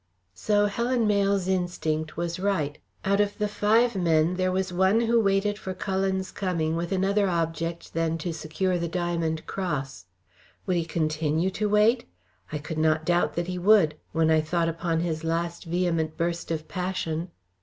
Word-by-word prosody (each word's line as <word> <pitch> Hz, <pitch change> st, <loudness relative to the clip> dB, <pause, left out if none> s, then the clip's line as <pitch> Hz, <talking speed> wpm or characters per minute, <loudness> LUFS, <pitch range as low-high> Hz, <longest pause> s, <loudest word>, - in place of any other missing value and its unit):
So 205 Hz, -, +2 dB
Helen 235 Hz, +3 st, 0 dB
Mayle's 200 Hz, -2 st, +2 dB
instinct 165 Hz, -4 st, -1 dB
was 170 Hz, +1 st, -2 dB
right. 165 Hz, -7 st, -1 dB, 0.3 s
Out 200 Hz, +1 st, +3 dB
of 205 Hz, 0 st, -1 dB
the 210 Hz, -, 0 dB
five 220 Hz, +3 st, +2 dB
men 165 Hz, -2 st, +2 dB
there 185 Hz, 0 st, 0 dB
was 185 Hz, 0 st, -1 dB
one 190 Hz, +5 st, +3 dB
who 235 Hz, 0 st, +3 dB
waited 205 Hz, 0 st, +1 dB
for 190 Hz, -3 st, -5 dB
Cullen's 190 Hz, -1 st, -1 dB
coming 165 Hz, -5 st, -1 dB
with 170 Hz, +1 st, -3 dB
another 195 Hz, +1 st, +2 dB
object 165 Hz, 0 st, -2 dB
than 165 Hz, 0 st, 0 dB
to 165 Hz, +1 st, -3 dB
secure 170 Hz, +4 st, -1 dB
the 170 Hz, -, -1 dB
diamond 170 Hz, -2 st, -2 dB
cross. 135 Hz, -, -4 dB, 0.6 s
Would 180 Hz, -2 st, +1 dB
he 165 Hz, -, 0 dB
continue 160 Hz, +2 st, 0 dB
to 210 Hz, +2 st, -1 dB
wait? 210 Hz, +4 st, +3 dB, 0.5 s
I 155 Hz, -, -2 dB
could 150 Hz, +2 st, -5 dB
not 155 Hz, 0 st, +2 dB
doubt 175 Hz, -3 st, +1 dB
that 175 Hz, -, -1 dB
he 180 Hz, 0 st, -4 dB
would, 190 Hz, -5 st, +5 dB, 0.2 s
when 160 Hz, 0 st, +2 dB
I 160 Hz, -1 st, +4 dB
thought 165 Hz, +2 st, 0 dB
upon 165 Hz, 0 st, -1 dB
his 165 Hz, -2 st, -2 dB
last 170 Hz, +1 st, -2 dB
vehement 165 Hz, -2 st, -1 dB
burst 170 Hz, 0 st, -2 dB
of 160 Hz, -1 st, -3 dB
passion. 180 Hz, -2 st, -3 dB
175 Hz, 170 wpm, -26 LUFS, 160-195 Hz, 0.6 s, would